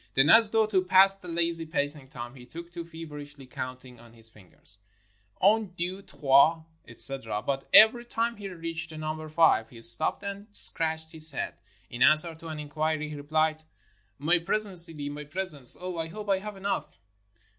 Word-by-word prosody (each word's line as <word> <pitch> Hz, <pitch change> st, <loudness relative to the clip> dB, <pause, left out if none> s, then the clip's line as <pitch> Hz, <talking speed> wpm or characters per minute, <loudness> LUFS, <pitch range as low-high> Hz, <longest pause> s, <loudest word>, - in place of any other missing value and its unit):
Then, 135 Hz, +4 st, +3 dB
as 225 Hz, -1 st, +6 dB
though 220 Hz, 0 st, +1 dB
to 200 Hz, -3 st, -1 dB
pass 190 Hz, +1 st, +5 dB
the 195 Hz, -2 st, -15 dB
lazy 170 Hz, -1 st, -2 dB
pacing 145 Hz, -3 st, -2 dB
time, 120 Hz, -2 st, -10 dB
he 130 Hz, -2 st, -15 dB
took 170 Hz, +7 st, -12 dB
to 170 Hz, -1 st, -8 dB
feverishly 150 Hz, -4 st, -12 dB
counting 130 Hz, -1 st, -10 dB
on 120 Hz, -1 st, -19 dB
his 115 Hz, -1 st, -17 dB
fingers. 100 Hz, -1 st, -12 dB, 0.3 s
*' 100 Hz, 0 st, -40 dB
Un, 210 Hz, -1 st, +1 dB
deux, 180 Hz, +3 st, -4 dB
trois," 160 Hz, -3 st, +1 dB, 0.2 s
etc. 115 Hz, -6 st, -1 dB
But 135 Hz, -1 st, -5 dB
every 225 Hz, +2 st, +6 dB
time 235 Hz, 0 st, -4 dB
he 200 Hz, -1 st, -9 dB
reached 165 Hz, -2 st, -5 dB
the 160 Hz, -, -11 dB
number 155 Hz, 0 st, -7 dB
five, 155 Hz, -8 st, +1 dB
he 120 Hz, -, -15 dB
stopped 115 Hz, -, +4 dB
and 200 Hz, +1 st, -8 dB
scratched 160 Hz, -5 st, +4 dB
his 160 Hz, -1 st, +4 dB
head. -, -, -5 dB, 0.4 s
In 120 Hz, -, -9 dB
an 155 Hz, +4 st, +5 dB
swer 165 Hz, +1 st, +4 dB
to 165 Hz, -, -12 dB
an 155 Hz, -1 st, -8 dB
inquiry, 155 Hz, +1 st, -4 dB
he 150 Hz, -, -9 dB
rephed: 155 Hz, +2 st, -3 dB, 0.3 s
— 95 Hz, +1 st, -42 dB
"My 175 Hz, +1 st, +3 dB
presents, 190 Hz, +1 st, +4 dB
Sidi, 150 Hz, -3 st, -9 dB
my 145 Hz, +1 st, -8 dB
presents. 150 Hz, -5 st, 0 dB
Oh, 180 Hz, -2 st, -7 dB
I 165 Hz, -, -4 dB
hope 205 Hz, +4 st, -7 dB
I 190 Hz, -, 0 dB
have 210 Hz, 0 st, -10 dB
enough!" 200 Hz, +1 st, -5 dB
160 Hz, 190 wpm, -25 LUFS, 140-185 Hz, 0.4 s, as